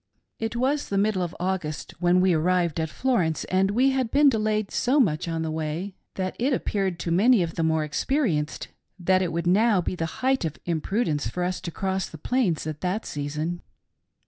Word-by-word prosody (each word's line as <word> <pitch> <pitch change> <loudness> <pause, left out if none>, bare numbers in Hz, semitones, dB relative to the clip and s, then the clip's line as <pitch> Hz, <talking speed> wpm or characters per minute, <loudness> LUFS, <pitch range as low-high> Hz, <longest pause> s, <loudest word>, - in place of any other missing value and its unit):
"lit 225 +1 -3
was 270 +4 0
the 200 - 0
middle 200 -1 +2
of 175 -1 -3
August 175 -4 -3
when 175 +1 +4
we 185 -1 +4
arrived 170 0 +1
at 160 -1 -1
Florence, 180 -9 0
and 190 +1 +1
we 255 +6 +3
had 260 -3 0
been 285 +3 +5
delayed 215 -3 0
so 260 +4 +2
much 170 - +2
on 165 -1 -2
the 160 - -2
way 160 +5 -3 0.2
that 185 -1 -2
it 260 +4 +2
appeared 195 -7 -1
•to 170 0 -2
many 215 +2 +5
of 165 -1 -4
the - - -2
more 160 -1 +2
experienced 155 - -1 0.3
that 185 +1 +2
it 180 -3 -1
would 170 +1 -2
now 205 +3 +4
be, 175 - -2
the 165 -2 -2 0.2
height 265 -3 +2
of 160 -3 -3
imprudence 170 -1 -1
for 180 - -3
us 180 0 -2
to - - -4
cross 190 +2 -2
the 160 - -10
Plains 190 - 0
at 155 -1 -5
that 185 +5 -1
season. 150 +4 -3
185 Hz, 200 wpm, -25 LUFS, 165-215 Hz, 0.3 s, been